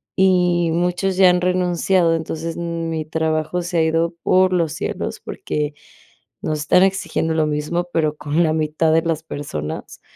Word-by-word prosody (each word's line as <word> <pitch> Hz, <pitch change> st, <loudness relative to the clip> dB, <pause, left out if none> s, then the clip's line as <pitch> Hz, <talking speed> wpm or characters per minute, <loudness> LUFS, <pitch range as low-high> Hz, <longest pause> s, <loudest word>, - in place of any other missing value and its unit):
y 180 Hz, -3 st, +3 dB
muchos 180 Hz, +2 st, 0 dB
ya 190 Hz, -1 st, +7 dB
han 180 Hz, 0 st, +2 dB
renunciado, 180 Hz, -1 st, +2 dB
entonces, 160 Hz, +1 st, -4 dB
m 170 Hz, -1 st, -3 dB
mi 160 Hz, -1 st, -2 dB
trabajo 160 Hz, +2 st, -1 dB
se 175 Hz, 0 st, -2 dB
ha -, -, +4 dB
ido 165 Hz, +1 st, 0 dB
por 185 Hz, 0 st, +3 dB
los 165 Hz, -3 st, +1 dB
cielos 175 Hz, -, -4 dB
porque 150 Hz, -, -4 dB, 0.7 s
nos 155 Hz, -1 st, -2 dB
están 180 Hz, +5 st, +4 dB
exigiendo 180 Hz, -4 st, 0 dB
lo 160 Hz, -1 st, +2 dB
mismo, 150 Hz, +4 st, -1 dB
pero 155 Hz, -2 st, +1 dB
con 150 Hz, +3 st, 0 dB
la 155 Hz, -1 st, +1 dB
mitad 155 Hz, +1 st, +1 dB
de 165 Hz, -, +4 dB
las 160 Hz, -1 st, -1 dB
personas, 80 Hz, -, -6 dB
165 Hz, 165 wpm, -20 LUFS, 155-180 Hz, 0.7 s, ya